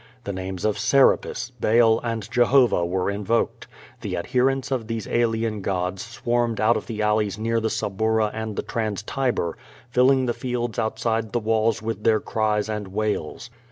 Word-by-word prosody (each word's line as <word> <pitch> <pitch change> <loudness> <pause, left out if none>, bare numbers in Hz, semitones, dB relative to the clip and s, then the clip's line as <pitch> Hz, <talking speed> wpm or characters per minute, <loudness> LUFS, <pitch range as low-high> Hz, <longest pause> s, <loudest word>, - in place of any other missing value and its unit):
The 100 - -4
names 95 0 -5
of 105 -1 0
Serapis, 130 -2 +2
Baal, 115 0 +4
and 115 -3 -3
Jehovah 120 -5 +4
were 90 +2 0
invoked. 105 +3 -1 0.3
The - - -3
adherents 130 +8 0
of 120 -5 -1
these 115 -2 -3
alien 115 -2 0
gods 95 -1 -2
swarmed 120 0 -1
out 115 +2 +4
of - - -4
the 110 -2 -3
alleys 105 -1 +1
near 115 +1 0
the 110 0 -1
Suburra 110 +1 0
and 110 -1 -4
the - - -2
Trans 110 -3 -3
Tiber, 125 -9 -1 0.3
filling 130 +1 +4
the 120 - 0
fields 120 -2 -3
outside 110 -1 -1
the 120 - +2
walls 110 0 +1
with 110 -1 -4
their 110 -1 +4
cries 105 -1 0
and 105 -2 -4
wails. 105 +2 -3
110 Hz, 165 wpm, -24 LUFS, 105-120 Hz, 0.3 s, Baal